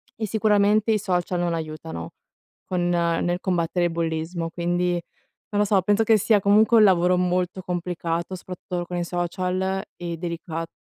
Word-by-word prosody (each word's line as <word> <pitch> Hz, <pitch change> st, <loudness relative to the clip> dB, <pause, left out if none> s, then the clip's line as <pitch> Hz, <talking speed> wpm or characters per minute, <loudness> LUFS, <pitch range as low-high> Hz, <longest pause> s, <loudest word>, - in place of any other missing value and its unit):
e 220 Hz, -1 st, -3 dB
sicuramente 210 Hz, 0 st, +3 dB
i 215 Hz, -, +2 dB
social 180 Hz, -2 st, -1 dB
non 175 Hz, -1 st, 0 dB
aiutano 155 Hz, -, -5 dB, 0.6 s
con 175 Hz, -1 st, +1 dB
nel 175 Hz, 0 st, +1 dB
combattere 175 Hz, -1 st, 0 dB
il -, -, -4 dB
bullismo. 165 Hz, 0 st, -2 dB
Quindi, 175 Hz, +1 st, 0 dB, 0.6 s
non 205 Hz, -1 st, 0 dB
lo -, -, +3 dB
so, 195 Hz, -1 st, +3 dB
penso 205 Hz, +3 st, +2 dB
che 220 Hz, -1 st, +5 dB
sia 210 Hz, +1 st, +3 dB
comunque 215 Hz, +4 st, +5 dB
un 215 Hz, -, +7 dB
lavoro 180 Hz, -1 st, +4 dB
molto 180 Hz, +1 st, 0 dB
complicato 175 Hz, 0 st, -3 dB
soprattutto, 180 Hz, -1 st, -6 dB
con 180 Hz, -, -5 dB
i 175 Hz, -, -1 dB
social 185 Hz, +2 st, -2 dB
e 170 Hz, -1 st, -5 dB
delicat 165 Hz, -1 st, -4 dB
180 Hz, 160 wpm, -24 LUFS, 170-195 Hz, 0.6 s, un